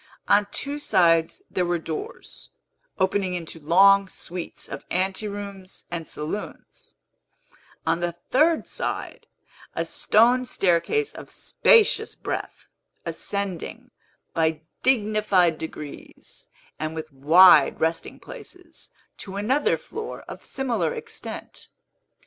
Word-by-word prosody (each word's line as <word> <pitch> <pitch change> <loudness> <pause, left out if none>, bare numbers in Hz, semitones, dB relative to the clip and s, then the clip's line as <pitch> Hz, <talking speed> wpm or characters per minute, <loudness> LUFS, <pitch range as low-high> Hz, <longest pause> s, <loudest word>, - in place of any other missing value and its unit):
On 205 0 +4
two 285 +6 -2
sides 175 - +3
there 180 - 0
were 175 0 0
doors, 160 -1 -7 0.5
opening 190 -1 +1
into 165 -1 -6
long 195 +5 +5
suites 180 -1 -6
of - - -7
anterooms 195 0 -3
and 165 -2 -4
saloons; 155 +8 -7 0.9
on 165 +1 +1
the 175 0 -1 0.2
third 315 +5 +3
side, - - -4 0.5
a - - -1
stone 240 +4 +3
staircase 195 - +1
of - - -10
spacious 455 -4 +3
breadth, - - -5 0.4
ascending, 200 -4 -4 0.4
by 160 -1 +1 0.2
dignified 210 -8 +2
degrees 155 -2 -9 0.3
and 155 +1 -3
with 155 -2 -7
wide 155 +3 +7
resting 165 +1 -1
places, 360 -3 -11 0.3
to 195 -1 -7
another 250 +9 +1
floor 445 - -7
of - - -10
similar 230 - -1
extent. - - -8
190 Hz, 105 wpm, -24 LUFS, 165-215 Hz, 0.9 s, wide